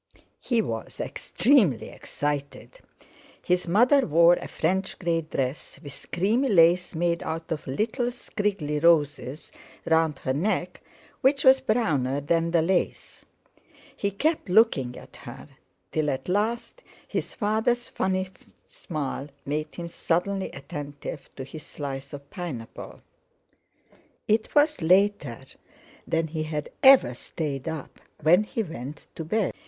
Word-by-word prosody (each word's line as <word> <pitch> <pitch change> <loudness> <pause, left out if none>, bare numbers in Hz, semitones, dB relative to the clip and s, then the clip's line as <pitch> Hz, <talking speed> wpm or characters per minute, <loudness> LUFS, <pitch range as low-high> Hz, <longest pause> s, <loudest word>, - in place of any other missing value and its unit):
He 235 -3 +1
was 115 - -5
extremely 210 - +2
excited. 145 - -4 0.6
His 180 0 +1
mother 245 - +5
wore 170 +3 +6
a - - -3
French 190 +4 -1
grey 170 -2 0
dress, 135 -3 -4
with 145 -2 -10
creamy 220 +10 +2
lace 175 -2 +4
made 170 +1 0
out 165 +1 -5
of 155 -3 -3
little 225 - -1
scriggly 200 - -2
roses, 145 -4 +2 0.3
round 160 -3 +2
her 130 - -2
neck, 180 +3 -1 0.4
which 275 +2 +3
was 265 0 +7
browner 155 - +1
than 165 +3 +1
the 165 -1 +3
lace. 180 +1 -1 0.7
He 200 - -1
kept 300 - -1
looking 180 - +3
at - - -13
her, - - -10 0.4
till 155 -1 0
at 135 -1 -3
last 220 - -1 0.3
his - - -3
father's 220 +3 0
funny 185 0 -1 0.4
smile 145 -3 -5 0.2
made 150 +2 -3
him 170 -1 -5
suddenly 180 +4 -1
attentive 145 +1 -7
to 135 - -6
his 155 +4 -9
slice 140 -1 -6
of 140 -1 -9
pineapple. 150 - -7 1.3
It 220 +5 +1
was 300 - +4
later 180 - +2 0.7
than 165 -1 0
he 155 0 -3
had 155 -1 -3
ever 265 - +7
stayed 140 +2 -5
up, 160 -3 -6 0.2
when 175 +6 +5
he 225 - -2
went 150 - -8
to 165 - -5
bed. 205 +5 0
170 Hz, 130 wpm, -26 LUFS, 145-205 Hz, 1.3 s, was